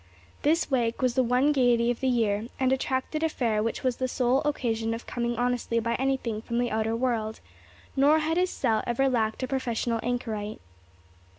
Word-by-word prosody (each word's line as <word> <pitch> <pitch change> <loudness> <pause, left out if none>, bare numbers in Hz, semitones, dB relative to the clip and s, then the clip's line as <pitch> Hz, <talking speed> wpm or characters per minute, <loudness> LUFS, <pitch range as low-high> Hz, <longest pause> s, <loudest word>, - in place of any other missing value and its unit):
This 315 +1 +1
wake 240 -1 0
was 250 -2 +3
the 260 - +3
one 250 +4 +3
gaiety 245 -4 +3
of 240 - -4
the 265 - 0
year, 225 -3 +1
and 260 0 +3
attracted 265 +3 -1
a 320 - +2
fair 225 -7 0
which 225 +1 -2
was 255 -2 0
the 260 - -1
sole 255 +1 +1
occasion 225 -6 -1
of 230 - -9
coming 240 0 -2
honestly 245 -1 0
by 230 +1 -1
anything 260 -5 -1
from 235 +1 -3
the 245 0 0
outer 220 +1 0
world; 230 -3 -1 0.6
nor 285 +3 +5
had 315 +1 0
his 365 0 +2
cell 220 -9 0
ever 245 +3 +2
lacked 225 -2 0
a - - -1
professional 240 -3 -1
anchorite. 220 -4 -3
245 Hz, 190 wpm, -27 LUFS, 230-265 Hz, 0.6 s, nor